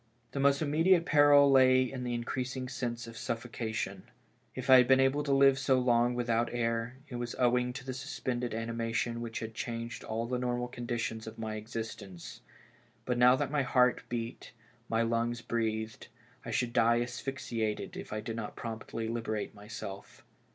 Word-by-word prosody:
The 140 - -4
most 140 +2 +3
immediate 165 +4 +3
peril 145 -1 +6
lay 130 -1 +6
in 130 0 -5
the 120 -1 -2
increasing 130 +2 -3
sense 120 -2 -4
of 115 0 -10
suffocation. 115 -2 -4 0.5
If - - -5
I 130 - +9
had 125 -1 +5
been 130 +1 +6
able 135 +2 +3
to 145 -1 -2
live 135 0 +5
so 135 -1 +3
long 120 -1 +3
with 120 -1 -2
out 115 0 +2
air, 115 +1 -1
it 125 - -6
was 120 0 -4
owing 125 0 +2
to 135 0 -8
the 130 - -4
suspended 125 -1 -3
animation 115 +1 -2
which 115 -1 -5
had 110 0 -5
changed 115 +1 -5
all 115 +1 -2
the 125 +1 -2
normal 125 0 -1
conditions 120 -2 -4
of 110 - -8
my 110 -1 -4
existence; 110 -4 -7 0.6
but 125 -1 0
now 125 +1 +7
that 130 - -2
my 150 -1 +2
heart 125 -1 +3
beat, 120 0 -5 0.4
my 115 0 +2
lungs 115 +1 0
breathed, 110 -1 -2 0.4
I - - -7
should 120 -1 -1
die 115 +1 +4
asphyxiated 120 -3 -3
if - - -8
I 110 0 -3
did 115 +1 -5
not 115 -2 -5
promptly 115 0 -5
liberate 110 -2 -3
myself. 100 -2 -9
120 Hz, 175 wpm, -31 LUFS, 115-130 Hz, 0.6 s, I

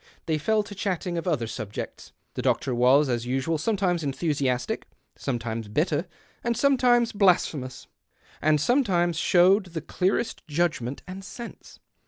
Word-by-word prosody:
They 155 -1 0
fell 215 +7 +2
to 205 - -9
chatting 185 -3 -2
of 170 - -7
other 145 -9 +1
subjects. 110 -2 -6 0.2
The - - -3
doctor 130 +2 +1
was, 130 +5 +4
as 120 -1 -1
usual, 135 +5 0
sometimes 185 -2 0
enthu 150 +3 -1
siastic, 130 -4 -1 0.3
sometimes 115 -3 -3
bitter, 155 - 0 0.4
and 235 -1 0
sometimes 245 -3 +3
blasphemous, 160 -10 +1 0.6
and 155 -1 +3
sometimes 175 - +2
showed 185 +3 +4
the 165 -2 -5
clearest 190 +8 -1
judgment 150 -5 -1
and 190 +1 -7
sense. 235 +4 -10
165 Hz, 140 wpm, -26 LUFS, 130-195 Hz, 0.6 s, was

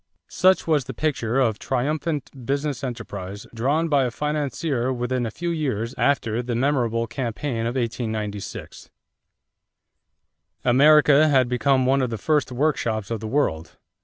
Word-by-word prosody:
Such 185 +2 +3
was 150 -5 +1
the 130 - -7
picture 135 -5 0
of 115 -5 +1
triumphant 145 +3 -2 0.2
business 140 0 -1
enterprise 105 -6 -6
drawn 140 +8 +1
by 140 -4 +3
a - - 0
financier 145 -1 -2
within 125 -1 -1
a - - -3
few 170 +10 -4
years 130 -8 -2
after 120 -5 +1
the 120 -1 -3
memorable 120 -3 +1
campaign 115 0 -3
of 120 - -3
1896. 110 -4 -4 1.8
America 150 +3 +6
had 130 -4 +3
become 130 +2 +2
one 135 +1 +3
of 130 - 0
the 115 - -3
first 150 +1 0
workshops 120 -6 -1
of 115 - -2
the 110 - -6
world. 110 - -1
130 Hz, 140 wpm, -23 LUFS, 115-145 Hz, 1.8 s, America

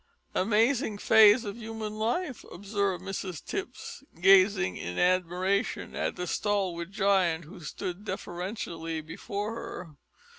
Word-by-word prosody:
"Amazing 225 +3 +2
phase 220 +2 +6
of 205 +1 -5
human 220 -2 -5
life!" 240 +7 -2
observed 200 0 -2
Mrs 190 -3 -5
Tipps, 385 -7 -6 0.2
gazing 185 - +5
in 90 +1 -5
admiration 185 +3 +1
at - - -1
the 180 - -3
stalwart 185 -3 -1
giant 190 -5 +2
who 180 +5 -12
stood 180 +4 -5
deferentially 175 -5 -4
before 205 +7 -5
her. 185 -6 -7
195 Hz, 115 wpm, -29 LUFS, 175-215 Hz, 0.2 s, phase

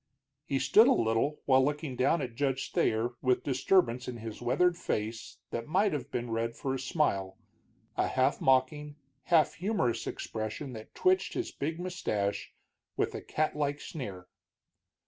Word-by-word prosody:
He 135 - 0
stood 220 - +6
a - - +6
little 115 +6 0
while 130 -1 +5
looking 145 -1 -2
down 140 +5 +2
at 120 - -5
Judge 135 +1 -1
Thayer, 110 +2 +1
a 130 -1 +4
disturbance 130 -2 +1
in 125 -1 -5
his 115 -1 -7
weathered 175 +9 +2
face 110 -7 -4
that 115 - -4
might 190 +5 +2
have 140 -2 -4
been 120 -2 -3
read 115 +1 -1
for 135 - -2
a 135 - -2
smile, 125 - 0 0.6
a - - +1
half 130 +2 +1
mocking, 140 +3 +2 0.3
half 165 -3 +4
humorous 180 - -1
expression 110 +5 -4
that 110 -1 -10
twitched 370 0 +2
his 360 - -2
big 160 +4 -3
mustache 110 - -2 0.5
with - - 0
a - - -5
catlike 150 -2 -1
sneer. 95 - -7
130 Hz, 155 wpm, -30 LUFS, 115-150 Hz, 0.6 s, stood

